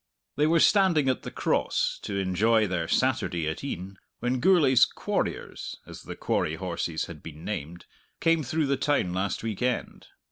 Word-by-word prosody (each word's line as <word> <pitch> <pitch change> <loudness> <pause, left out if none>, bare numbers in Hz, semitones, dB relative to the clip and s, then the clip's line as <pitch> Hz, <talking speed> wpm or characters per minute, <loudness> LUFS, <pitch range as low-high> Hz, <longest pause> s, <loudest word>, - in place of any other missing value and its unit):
They 150 +1 +3
were 165 +1 +4
standing 180 -7 +4
at 130 - 0
the - - -6
Cross, - - 0
to 100 - -4
enjoy 105 +4 +2
their 90 -4 -2
Saturday 85 -1 0
at 80 +9 -4
e'en, 95 -7 -6 0.2
when 125 +1 0
Gourlay's 140 -6 +5
"quarriers" - - -2
as - - -10
the - - -8
quarry 75 - -1
horses 85 -2 -3
had 75 -4 -10
been 80 0 -10
named 85 -4 -5 0.3
came 165 -1 +3
through 155 +3 0
the 140 0 +1
town 140 -12 +1
last 95 +3 -2
week 110 -2 -4
end. 125 0 -2
110 Hz, 170 wpm, -27 LUFS, 90-140 Hz, 0.3 s, Gourlay's